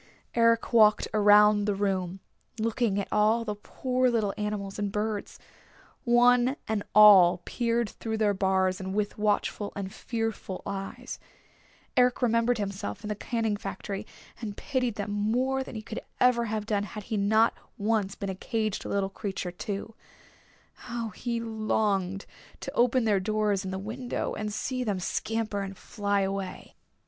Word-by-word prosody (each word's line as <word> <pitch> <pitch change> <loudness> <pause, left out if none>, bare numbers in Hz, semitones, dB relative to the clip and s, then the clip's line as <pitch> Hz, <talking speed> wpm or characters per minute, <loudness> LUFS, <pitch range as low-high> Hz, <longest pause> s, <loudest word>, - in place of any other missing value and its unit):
Eric 230 0 +3
walked 215 -2 +5
around 210 0 +6
the 205 -1 0
room, 190 -2 -1 0.4
looking 225 -2 0
at 200 - -3
all 220 +2 +3
the 210 - -2
poor 255 +4 0
little 220 -4 0
animals 210 -1 -4
and 205 -1 -1
birds. 210 0 -3 0.7
One 245 +2 +4
and 220 -1 0
all 190 -4 +8
peered 235 -1 0
through 220 +2 -4
their 210 -2 +2
bars 190 0 +1
with 205 +3 -2
watchful 210 0 0
and 195 -1 -5
fearful 225 -5 -4
eyes. 195 -1 -6 0.8
Eric 250 0 +3
remembered 230 0 +2
himself 200 0 -4
in 210 - -5
the 210 - -1
canning 225 0 -1
factory 200 +1 -5 0.3
and 210 -3 -5
pitied 255 -5 -1
them 205 -1 -4
more 250 +6 0
than 260 - -10
he 215 - -5
could 220 +1 -6 0.2
ever 245 -2 +4
have 215 -1 -3
done 210 -2 0
had 205 +1 -6
he 220 - -4
not 220 +3 +3 0.2
once 205 -2 0
been 200 - -4
a - - -3
caged 215 +2 -2
little 200 -1 0
creature 190 -3 -4
too. 200 +4 -5 0.8
How 235 -2 -5
he 235 +4 -3
longed 215 -4 -1 0.4
to - - -5
open 245 +1 +3
their 210 -3 +3
doors 210 0 0
and 190 - -4
the 190 - -3
window, 230 +6 -4
and 210 0 -3
see 255 +4 -2
them 205 -5 -1
scamper 215 +2 -2
and 195 -1 -6
fly 200 -1 -1
away! 195 -1 -4
210 Hz, 155 wpm, -28 LUFS, 200-230 Hz, 0.8 s, all